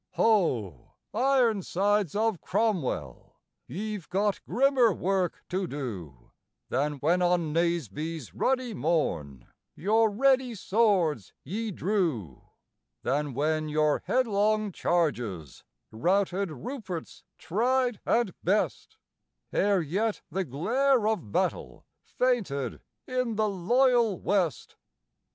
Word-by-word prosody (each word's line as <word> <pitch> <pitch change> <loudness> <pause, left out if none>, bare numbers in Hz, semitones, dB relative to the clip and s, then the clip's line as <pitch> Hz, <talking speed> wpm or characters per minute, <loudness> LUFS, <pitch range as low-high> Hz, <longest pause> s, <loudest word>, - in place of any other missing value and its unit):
Ho! 125 - +1 0.2
Ironsides 210 - +2
of 220 -3 0
Cromwell, 140 - -2 0.3
ye've 205 - -5
got 200 +2 0
grimmer 260 -2 +4
work 185 -1 -1
to 185 +1 -1
do, 95 - -7 0.4
Than 145 +2 0
when 160 +6 +1
on 175 -3 +1
Naseby's 165 - -2
ruddy 255 -3 0
morn 85 - -1 0.3
your 220 +4 +3
ready 255 +2 +2
swords 185 - +1
ye 220 +4 -3
drew 165 - -1 0.6
Than 145 -1 -1
when 155 +2 0
your 150 0 +2
headlong 215 -3 +1
charges 120 - -1 0.3
routed 185 - +1
Rupert's 175 - -7
tried 245 +4 0
and 230 -6 +1
best, 200 +4 0 0.6
Ere 200 -2 +3
yet 205 +8 -1
the 190 - -1
glare 225 - +1
of 215 - -2
battle 65 - -2 0.2
fainted 185 - -1 0.2
in 255 -3 -1
the 215 0 +1
loyal 230 +2 +2
West. 185 -6 -1
190 Hz, 100 wpm, -28 LUFS, 150-220 Hz, 0.6 s, grimmer